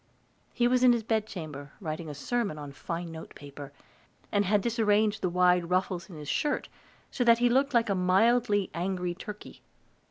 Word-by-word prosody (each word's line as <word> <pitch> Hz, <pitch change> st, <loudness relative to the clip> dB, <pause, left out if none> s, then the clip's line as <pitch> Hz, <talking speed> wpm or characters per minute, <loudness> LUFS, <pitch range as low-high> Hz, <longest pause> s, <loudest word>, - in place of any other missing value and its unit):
He 240 Hz, -, +2 dB
was 250 Hz, 0 st, +2 dB
in 250 Hz, -1 st, +7 dB
his 235 Hz, -2 st, -1 dB
bedchamber, 170 Hz, -11 st, -4 dB
writing 160 Hz, -2 st, -5 dB
a 145 Hz, -, -6 dB
sermon 205 Hz, -, -2 dB
on 145 Hz, -1 st, -7 dB
fine 170 Hz, +4 st, -5 dB
note 160 Hz, 0 st, -10 dB
paper, 145 Hz, 0 st, -10 dB, 0.6 s
and 205 Hz, 0 st, +2 dB
had 205 Hz, +2 st, +2 dB
disarranged 215 Hz, -2 st, +1 dB
the 180 Hz, -, 0 dB
wide 180 Hz, -1 st, +3 dB
ruffles 180 Hz, -1 st, -1 dB
of 175 Hz, -, -10 dB
his 150 Hz, -1 st, -9 dB
shirt 295 Hz, -, -1 dB, 0.4 s
so 250 Hz, -, 0 dB
that 235 Hz, -1 st, +6 dB
he 245 Hz, +1 st, +3 dB
looked 270 Hz, +2 st, +2 dB
like 230 Hz, -1 st, +4 dB
a 200 Hz, -, +1 dB
mildly 205 Hz, +2 st, +2 dB
angry 180 Hz, 0 st, -2 dB
turkey. 210 Hz, +3 st, -10 dB
190 Hz, 180 wpm, -28 LUFS, 170-230 Hz, 0.6 s, in